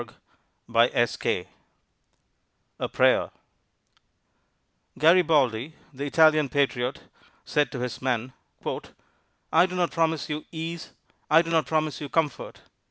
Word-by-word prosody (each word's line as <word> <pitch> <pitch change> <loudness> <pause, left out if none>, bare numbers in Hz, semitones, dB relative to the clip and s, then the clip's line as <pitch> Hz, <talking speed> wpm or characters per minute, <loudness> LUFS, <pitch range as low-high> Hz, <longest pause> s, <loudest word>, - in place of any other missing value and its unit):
_ 120 0 +1 1.3
A - - -2
PRAYER - - +3 1.7
Garibaldi, 155 -5 +3 0.2
the 140 +2 -5
Italian 155 -1 +4
patriot, 135 -2 -1 0.4
said 150 -1 0
to 125 - -5
his 125 -2 -4
men: 125 -1 -2 1.2
"I 170 +3 +5
do 185 - -7
not 175 -1 0
promise 160 -4 0
you 150 0 -5
ease; 165 +1 -6 0.4
I 160 +2 +6
do 165 - -6
not 160 -2 +2
promise 155 -1 -1
you 145 - -5
comfort. 150 -5 -2
150 Hz, 105 wpm, -25 LUFS, 130-160 Hz, 1.7 s, I